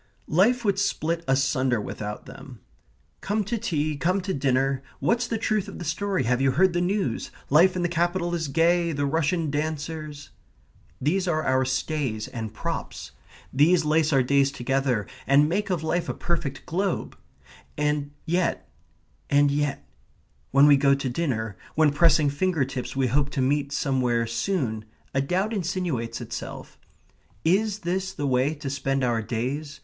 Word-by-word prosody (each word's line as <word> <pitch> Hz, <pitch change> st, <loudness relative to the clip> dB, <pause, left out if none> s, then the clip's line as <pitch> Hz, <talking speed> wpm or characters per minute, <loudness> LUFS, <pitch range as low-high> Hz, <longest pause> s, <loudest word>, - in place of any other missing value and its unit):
Life 235 Hz, +8 st, +3 dB
would 200 Hz, -1 st, +2 dB
split 170 Hz, -4 st, -1 dB
asunder 135 Hz, -2 st, +2 dB
without 105 Hz, 0 st, -6 dB
them. -, -, -11 dB, 0.6 s
"Come 210 Hz, +2 st, 0 dB
to 215 Hz, +4 st, -2 dB
tea, 155 Hz, -8 st, -1 dB
come 185 Hz, +6 st, +1 dB
to 190 Hz, +1 st, -3 dB
dinner, 135 Hz, 0 st, +1 dB, 0.2 s
what's 235 Hz, 0 st, +1 dB
the 230 Hz, -, -1 dB
truth 215 Hz, -2 st, 0 dB
of 200 Hz, -, -8 dB
the 175 Hz, -, -6 dB
story? 185 Hz, +2 st, -1 dB
have 125 Hz, +2 st, +1 dB
you 135 Hz, -, +4 dB
heard 185 Hz, +5 st, +3 dB
the 175 Hz, -, +1 dB
news? 180 Hz, -, -1 dB, 0.2 s
life 175 Hz, +6 st, +6 dB
in 180 Hz, -, -1 dB
the -, -, +2 dB
capital 175 Hz, +1 st, 0 dB
is 165 Hz, -3 st, -1 dB
gay; 170 Hz, +3 st, +2 dB
the 145 Hz, 0 st, -1 dB
Russian 160 Hz, +1 st, 0 dB
dancers...." 155 Hz, 0 st, -4 dB, 0.7 s
These 180 Hz, +7 st, 0 dB
are 155 Hz, -2 st, +1 dB
our 130 Hz, 0 st, +2 dB
stays 130 Hz, -5 st, -2 dB
and 110 Hz, -3 st, -5 dB
props. -, -, -5 dB, 0.4 s
These 160 Hz, +4 st, +4 dB
lace 155 Hz, +1 st, +2 dB
our 135 Hz, -3 st, +4 dB
days 140 Hz, +1 st, +3 dB
together 135 Hz, -4 st, 0 dB, 0.2 s
and 140 Hz, +2 st, +5 dB
make 200 Hz, +6 st, -1 dB
of 175 Hz, -4 st, -1 dB
life 170 Hz, +2 st, -1 dB
a -, -, -2 dB
perfect 150 Hz, -6 st, -3 dB
globe. 190 Hz, +3 st, -2 dB, 0.6 s
And 150 Hz, -1 st, 0 dB, 0.2 s
yet, 175 Hz, -, 0 dB, 0.6 s
and 145 Hz, 0 st, +4 dB
yet... 145 Hz, 0 st, -1 dB, 0.6 s
when 140 Hz, +2 st, +6 dB
we 145 Hz, -1 st, +7 dB
go 140 Hz, 0 st, +4 dB
to 135 Hz, -1 st, -3 dB
dinner, 115 Hz, -, -2 dB, 0.2 s
when 155 Hz, -2 st, +4 dB
pressing 155 Hz, -2 st, +4 dB
finger 160 Hz, -1 st, +1 dB
tips 130 Hz, -1 st, -5 dB
we 135 Hz, -1 st, +1 dB
hope 140 Hz, +3 st, +1 dB
to 140 Hz, -, -4 dB
meet 140 Hz, +2 st, +1 dB
somewhere 125 Hz, -5 st, +1 dB
soon, 115 Hz, -, -2 dB, 0.3 s
a 135 Hz, -, +2 dB
doubt 185 Hz, +10 st, 0 dB
insinuates 170 Hz, -, -2 dB
itself; 120 Hz, 0 st, -7 dB, 0.7 s
is 205 Hz, +4 st, +2 dB
this 190 Hz, +2 st, -2 dB
the 145 Hz, -, -3 dB
way 135 Hz, +3 st, +1 dB
to 145 Hz, -1 st, -7 dB
spend 135 Hz, -1 st, -1 dB
our 120 Hz, -2 st, +1 dB
days? 130 Hz, +7 st, -4 dB
150 Hz, 165 wpm, -25 LUFS, 135-175 Hz, 0.7 s, we